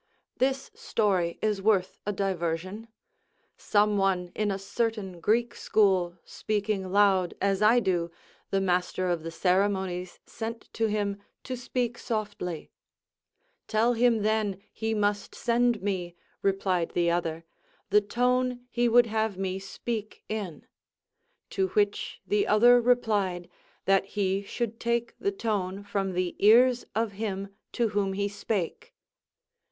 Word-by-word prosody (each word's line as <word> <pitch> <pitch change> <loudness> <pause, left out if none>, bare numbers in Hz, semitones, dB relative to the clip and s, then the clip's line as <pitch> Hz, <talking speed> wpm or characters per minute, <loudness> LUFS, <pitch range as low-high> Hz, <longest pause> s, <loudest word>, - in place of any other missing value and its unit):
This 265 +1 0
story 185 -6 0
is 210 -2 +1
worth 195 -3 +1
a - - +2
diversion. 190 +2 -2 0.7
Some 210 0 +2
one 185 -2 +1
in 215 -1 0
a 195 - -1
certain 200 -2 -3
Greek 230 +7 +1
school 185 -4 +2
speaking 205 -3 -2
loud 195 -3 +3
as 195 0 +1
I 225 +3 +6
do, 175 -5 0 0.4
the 195 - +1
master 180 0 0
of 170 -2 -1
the 165 - -5
ceremonies 185 0 0
sent 225 0 -7
to 225 0 +1
him 205 -1 -1 0.2
to 255 - -4
speak 245 -1 -2
softly: 205 -7 -4 1.0
"Tell 230 +3 +2
him, 230 -2 +3
then, 215 -3 0
he 220 0 -2
must 205 -1 -1
send 240 -2 +1
me," 180 -4 -2 0.3
replied 190 -3 0
the 170 -1 +3
other, 165 -1 -1 0.5
"the 210 +1 +6
tone 250 +3 0
he 240 0 +2
would 240 +1 +6
have 220 -3 -1
me 190 0 -2
speak 215 +2 -5
in." 200 -7 -5 0.9
To 190 -1 +1
which 205 -1 0
the 205 +2 +1
other 240 +3 +6
replied, 210 -8 +1 0.3
"That 195 0 +3
he 195 -1 -1
should 230 +2 -4
take 235 0 -1
the 400 - 0
tone 200 - -2
from 195 -2 -2
the 180 0 -1
ears 245 +3 +6
of 225 -1 0
him 200 -1 -4 0.2
to 235 -3 +1
whom 200 -2 0
he 200 +1 0
spake." 200 -3 -4
205 Hz, 135 wpm, -28 LUFS, 190-225 Hz, 1.0 s, I